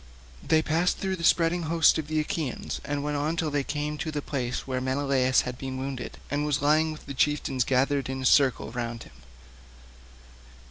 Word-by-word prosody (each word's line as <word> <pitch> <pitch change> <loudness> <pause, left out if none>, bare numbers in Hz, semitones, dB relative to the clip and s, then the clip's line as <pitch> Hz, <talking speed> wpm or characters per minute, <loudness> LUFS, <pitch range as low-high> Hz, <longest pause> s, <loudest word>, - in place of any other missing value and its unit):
They 160 -1 +2
passed 165 +4 +1
through 190 -1 -2
the 170 - -7
spreading 170 +1 +3
host 165 -1 +4
of 155 - -4
the 155 0 0
Achaeans 150 -3 -3
and 145 0 -3
went 150 0 -1
on 150 +3 -1
till 160 -2 -1
they 145 -1 0
came 150 +1 -3
to 160 - -3
the 150 -1 -2
place 125 -4 -3
where 130 -1 -2
Menelaus 130 -1 +2
had 125 0 -6
been 130 -1 -5
wounded 130 -2 -5
and 145 +1 0
was 150 -1 0
lying 155 +2 +3
with 155 - -10
the 140 - -6
chieftains 135 -2 +1
gathered 135 +1 +1
in 130 0 -4
a - - -2
circle 130 -3 +3
round 120 -1 -4
him. - - -16
145 Hz, 195 wpm, -27 LUFS, 130-155 Hz, -, host